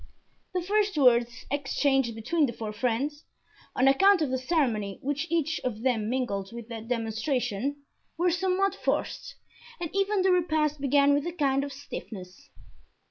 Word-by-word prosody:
The 360 - 0
first 410 -1 +1
words 240 -2 +3
exchanged 270 -3 +1
between 280 +7 +1
the 235 - -4
four 220 -2 -5
friends, 255 +7 -1 0.5
on 260 - +3
account 375 +6 +5
of 275 - -2
the 260 - +1
ceremony 245 - 0
which 290 +3 -2
each 325 -1 0
of 230 -3 -3
them 225 -5 +1
mingled 200 -7 -2
with 235 -1 -9
their 225 -2 -6
demonstration, 240 +3 -2 0.3
were 350 +1 +2
somewhat 380 +2 +1
forced - - -2 0.4
and 340 -3 -4
even 395 0 +2
the 380 - +4
repast 310 -5 +1
began 280 +1 +4
with 290 +3 0
a - - -2
kind 275 -5 +1
of 285 - -5
stiffness. 200 -9 -9
275 Hz, 155 wpm, -28 LUFS, 235-325 Hz, 0.5 s, account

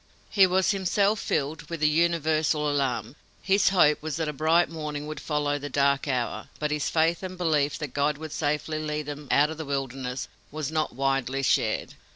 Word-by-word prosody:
He 195 -2 +6
was 185 +2 +2
himself 200 +2 +1
filled 145 +2 -2
with 170 -1 -4
the 150 - +5
universal 155 -1 +2
alarm. 130 -4 -1 0.3
His 195 0 +4
hope 150 -6 +4
was 155 -2 -3
that 160 0 -2
a 150 - -2
bright 160 +4 +3
morning 150 -2 -5
would 155 0 -6
follow 145 -1 -1
the 145 +1 -6
dark 140 +1 +2
hour, 120 -5 -2
but 150 0 -2
his 150 -2 0
faith 165 +1 +2
and 185 -1 -6
belief 150 -5 +1
that 150 -5 -6
God 145 +1 +1
would 155 0 -7
safely 150 +1 -1
lead 150 -1 -3
them 145 0 -7
"out 150 +2 +4
of 160 - -7
the 160 - -4
wilderness" 135 -2 -3 0.2
was 155 -1 -4
not 155 -5 -1
widely 135 0 0
shared. - - +1
150 Hz, 195 wpm, -26 LUFS, 140-160 Hz, 0.3 s, He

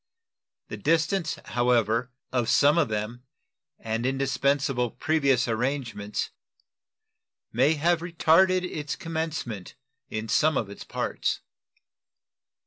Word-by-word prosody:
The - - -5
distance, 165 +2 +1
however, 120 0 +1 0.2
of 125 -2 0
some 145 +5 +5
of - - +3
them 110 +3 -3 0.6
and 115 +1 -3
indispensable 135 -1 +1
previous 140 -3 +1
arrangements 115 -3 -2 1.2
may 135 +7 +3
have 170 +3 +2
retarded 175 +2 +3
its 150 -4 -4
commencement 160 - -4 0.3
in 110 +1 -4
some 155 +6 +3
of 100 -3 -2
its - - -9
parts. - - -2
135 Hz, 100 wpm, -26 LUFS, 115-160 Hz, 1.2 s, some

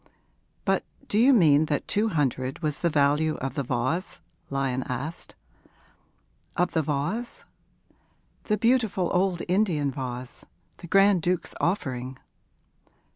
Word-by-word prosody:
But - - +2 0.2
do 210 - +1
you 255 +4 +6
mean 160 - +5
that 150 -1 -2
two 215 +2 +1
hundred 135 - -1
was 150 -2 -1
the 170 - +2
value 150 +1 +2
of 135 -1 -4
the 140 - -2
vase?' 135 +8 -2 0.3
Lyon 135 -2 -1
asked. 145 +6 -5 1.2
'Of 180 0 +2
the 160 - +1
vase?' 155 +12 -3 1.0
'The 210 - +1
beautiful 225 -6 +1
old 180 -1 +1
Indian 175 -7 +1
vase 125 -2 -6 0.3
the 175 - -10
Grand 195 +1 +4
Duke's 180 +1 -1
offering.' 130 -8 -2
160 Hz, 125 wpm, -26 LUFS, 135-190 Hz, 1.2 s, you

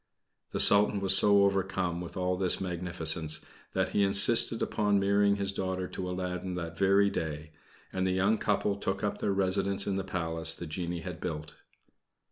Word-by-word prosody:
The - - -5
Sultan 100 0 +4
was 95 -1 +6
so 100 -1 +6
overcome 95 -3 -2
with 90 - -9
all 90 0 -1
this 90 -1 +1
magnificence, 85 -3 0 0.3
that - - -1
he 105 - -1
insisted 110 +4 +4
upon 105 -2 0
marrying 100 +1 +2
his 100 -1 -2
daughter 95 -1 -4
to 90 -1 -6
Aladdin 90 0 -5
that 85 -2 -6
very 100 +2 +2
day, 75 -1 -5 0.4
and 95 0 -1
the - - 0
young 100 +4 0
couple 105 -1 -1
took 100 0 -4
up 105 - -3
their 100 - -1
residence 95 +1 -1
in 100 -1 -2
the 95 - -3
Palace 80 -3 +1
the 85 - -8
genie 85 +1 -5
had - - -8
built. 75 0 -6
95 Hz, 175 wpm, -28 LUFS, 85-100 Hz, 0.4 s, was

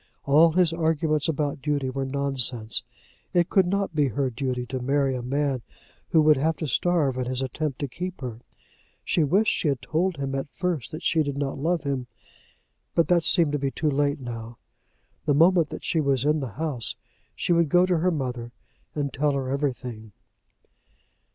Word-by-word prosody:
All 155 +4 +5
his 175 -2 +3
arguments 160 -1 +1
about 145 -2 -1
duty 140 -3 -1
were 135 0 -3
nonsense. 130 -4 0 0.5
It 175 0 +3
could 190 -3 +4
not 200 -1 -1
be 150 -2 +2
her 130 +2 -1
duty 125 0 -2
to 130 +2 -4
marry 135 +1 +1
a 125 - -3
man 135 +1 -1 0.5
who 160 -3 +4
would 155 -1 +5
have 160 +4 +1
to 160 - -3
starve 150 -2 +1
in 125 - -1
his 130 0 -2
attempt 135 +1 -3
to 145 - -1
keep 180 +7 -6
her. 120 -4 -5 0.7
She 165 - +2
wished 195 +9 +3
she - - 0
had 140 -3 +1
told 170 +4 -1
him 135 -1 -3
at 135 +1 -3
first 170 -5 -2
that 155 +2 -8
she 160 0 +2
did 140 -2 -2
not 140 -1 -2
love 165 +2 0
him, 135 -3 -2 0.9
but 165 - +3
that 175 -2 +4
seemed 165 -3 +4
to 145 - -1
be 135 0 0
too 150 +2 -1
late 145 +1 +1
now. 115 -2 -7 0.7
The 145 - +3
moment 165 0 +5
that - - -7
she 160 - +1
was 140 -2 +1
in 150 +1 +3
the 130 -7 -5
house 135 -10 -2 0.4
she 175 - 0
would 170 -2 +3
go 180 +3 +5
to 180 -3 +1
her 180 +3 +2
mother 125 -7 -3 0.4
and 145 -2 -2
tell 145 +1 +1
her 135 -2 -2
everything. 125 -6 -3
145 Hz, 190 wpm, -25 LUFS, 130-160 Hz, 0.9 s, All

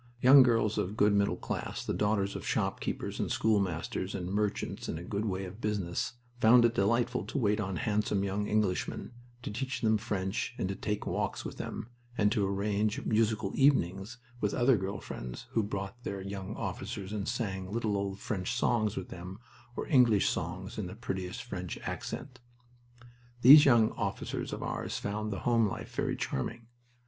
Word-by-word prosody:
Young 135 +3 +9
girls 115 -4 +3
of 100 +4 -2
good 105 -1 +4
middle 100 0 +2
class, - - -4
the - - -1
daughters 105 -1 +1
of - - -5
shopkeepers - - -2
and - - -1
schoolmasters, 95 -3 0
and 90 +1 -3
merchants 105 0 -1
in - - -2
a 85 - -7
good 100 +4 -2
way 95 -2 -2
of 95 +5 -10
business, 105 +2 -1 0.3
found 120 +1 +7
it 115 - +3
delightful 115 +3 +1
to - - -4
wait 105 -4 +2
on 95 -3 -2
handsome 105 0 0
young 100 +1 -1
Englishmen, 105 -1 0 0.3
to - - -4
teach 130 +4 -3
them 110 -1 +3
French, 100 +3 -2
to 95 +1 -1
take 105 0 -3
walks - - -2
with - - -6
them, 115 - -5 0.3
and 105 -1 +3
to 105 -2 +1
arrange 105 +2 0
musical 110 -3 +1
evenings 115 -5 +2 0.2
with 105 -3 0
other 125 +1 +4
girl 95 -1 -3
friends - - -7
who 115 - +2
brought 100 +3 -5
their 100 -2 -4
young 100 +1 -5
officers 100 +1 -5
and 100 -2 -3
sang 100 -6 -3
little 110 -2 0
old 100 -1 -2
French 95 +2 -2
songs 110 -3 +1
with 95 - -4
them 90 +2 -8 0.4
or - - -3
English 120 - +4
songs 90 +5 -3
in 100 - -3
the 90 - -8
prettiest 95 -5 -4
French - - -5
accent. 130 -1 -5 1.0
These 145 +5 +11
young 115 -5 +5
officers - - -3
of - - -4
ours - - -3
found 105 +1 -3
the 100 - -4
home 115 -2 +3
life - - -6
very - - 0
charming. 115 - -3
105 Hz, 175 wpm, -31 LUFS, 95-115 Hz, 1.0 s, These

